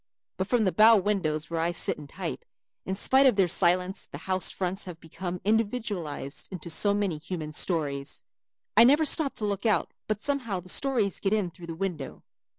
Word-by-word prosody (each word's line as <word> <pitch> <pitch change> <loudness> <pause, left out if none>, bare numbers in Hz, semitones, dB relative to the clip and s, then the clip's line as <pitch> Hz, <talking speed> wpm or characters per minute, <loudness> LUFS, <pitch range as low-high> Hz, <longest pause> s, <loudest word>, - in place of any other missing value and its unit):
But 190 - -2
from 240 0 +2
the 190 - +2
bow 220 +3 +6
windows 170 -6 -1
where 165 - -1
I 170 +1 0
sit 170 - -1
and 145 -1 -11
type, 180 -1 -6 0.4
in 190 - -1
spite 265 +7 +4
of 255 - +3
their 195 -2 +3
silence 180 +1 +1
the - - -9
house 185 +4 0
fronts 190 +2 -3
have 175 -3 -9
become 175 +2 -6
individualized 205 - -2
into 175 -2 -5
so 200 +5 +2
many 195 -7 -1
human 155 -2 -6
stories. 150 -4 0 0.5
I - - +8
never 290 +6 +5
stop 295 -1 +4
to 215 - -2
look 200 -1 -2
out 215 - +1 0.2
but 215 -1 -1
somehow 250 -8 -2
the 180 +1 -11
stories 235 -4 +1
get 195 0 0
in 200 -5 0
through 170 +1 -12
the 165 - -6
window. 170 -7 -5
190 Hz, 195 wpm, -27 LUFS, 165-210 Hz, 0.5 s, I